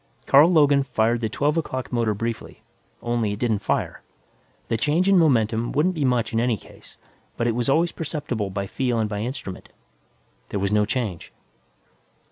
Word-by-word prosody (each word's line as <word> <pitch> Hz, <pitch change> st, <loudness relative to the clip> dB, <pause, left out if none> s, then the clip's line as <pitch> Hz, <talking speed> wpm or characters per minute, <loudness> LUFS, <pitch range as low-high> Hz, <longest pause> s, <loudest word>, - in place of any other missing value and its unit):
Carl 150 Hz, +6 st, +6 dB
Logan 145 Hz, -4 st, +4 dB
fired 120 Hz, -2 st, 0 dB
the 110 Hz, -, -1 dB
twelve 145 Hz, +7 st, 0 dB
o'clock 130 Hz, -6 st, -3 dB
motor 115 Hz, -3 st, +1 dB
briefly 115 Hz, +2 st, -5 dB, 0.4 s
only 120 Hz, -3 st, 0 dB
it -, -, -5 dB
didn't 110 Hz, -2 st, 0 dB
fire. -, -, -2 dB, 0.7 s
The -, -, 0 dB
change 150 Hz, -, +1 dB
in 195 Hz, -, +5 dB
momentum 115 Hz, -7 st, +2 dB
wouldn't 160 Hz, +6 st, +2 dB
be 155 Hz, -4 st, -2 dB
much 120 Hz, -3 st, 0 dB
in 115 Hz, -, +1 dB
any 120 Hz, -2 st, +1 dB
case, -, -, -16 dB, 0.4 s
but 120 Hz, -, -1 dB
it 120 Hz, -, +1 dB
was 120 Hz, +3 st, -1 dB
always 165 Hz, +5 st, +2 dB
perceptible 140 Hz, -10 st, -3 dB
by 100 Hz, +1 st, -3 dB
feel 125 Hz, +4 st, -1 dB
and 110 Hz, -1 st, +1 dB
by 105 Hz, -1 st, -4 dB
instrument. 110 Hz, -5 st, -6 dB, 0.8 s
There 100 Hz, -, -3 dB
was 100 Hz, +1 st, -1 dB
no 105 Hz, 0 st, +3 dB
change. 105 Hz, -6 st, -3 dB
120 Hz, 175 wpm, -23 LUFS, 110-140 Hz, 0.8 s, Carl